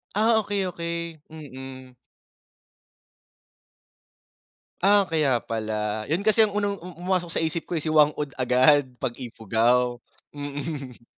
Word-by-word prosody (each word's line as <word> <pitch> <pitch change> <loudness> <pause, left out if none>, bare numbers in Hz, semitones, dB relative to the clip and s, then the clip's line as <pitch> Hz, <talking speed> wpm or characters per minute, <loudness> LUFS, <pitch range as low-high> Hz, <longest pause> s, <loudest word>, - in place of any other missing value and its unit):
Ah, 220 +1 +4
okey-okey. 170 -5 -3
Mm. 130 -4 -10 2.9
Ah, 200 +1 +5
kaya 150 -7 +2
pala. 110 -1 -3
'Yun 175 +6 0
kasi 220 +1 +5
ang 210 -2 +2
unang, 205 -1 -1
um 180 0 -9
pumasok 180 -2 0
sa - - +1
isip 160 +1 -3
ko, 175 - -1
eh, 150 - -3
si 155 - -1
Whang-Od 150 -2 +3
agad 130 +2 +4
'pag 120 - -3
Ifugao, 120 +1 +1 0.3
mm. 145 -3 -6
150 Hz, 120 wpm, -25 LUFS, 125-175 Hz, 2.9 s, Ah